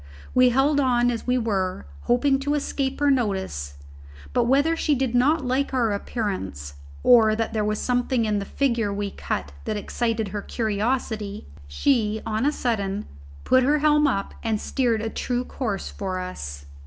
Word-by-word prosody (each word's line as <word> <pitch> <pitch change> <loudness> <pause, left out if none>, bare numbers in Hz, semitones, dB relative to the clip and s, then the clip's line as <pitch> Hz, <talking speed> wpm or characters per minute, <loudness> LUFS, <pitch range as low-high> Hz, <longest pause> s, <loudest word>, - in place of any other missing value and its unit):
We 255 0 +6
held 275 +4 +3
on 245 -2 +3
as 235 0 -5
we 250 0 +3
were, 195 - -1 0.2
hoping 270 +3 +3
to 290 +2 0
escape 275 -2 -2
her 290 -1 +4
notice; 190 - -1 0.6
but - - +2
whether 285 +6 +3
she 305 -2 +1
did 260 -2 -1
not 275 +4 +3
like 265 +2 0
our 235 -4 +2
appearance, 185 - -4 0.3
or 220 -3 +6
that 225 0 -2
there 215 -1 0
was 210 0 0
something 245 -1 +1
in 210 -1 +1
the 200 - -4
figure 235 -4 0
we 200 0 -3
cut 70 - -4
that 215 - -2
excited 225 0 -2
her 205 +1 -4
curiosity, 215 - -2 0.2
she, 220 - +1
on 220 +5 0
a - - +3
sudden, 210 -7 -2 0.4
put 255 - +4
her 290 +4 +3
helm 300 0 +4
up 195 -7 -1
and 220 -2 -1
steered 235 -4 0
a 225 - -1
true 245 +2 -2
course 215 -8 -4
for 190 -2 -4
us. 70 - -6
230 Hz, 170 wpm, -24 LUFS, 205-260 Hz, 0.6 s, We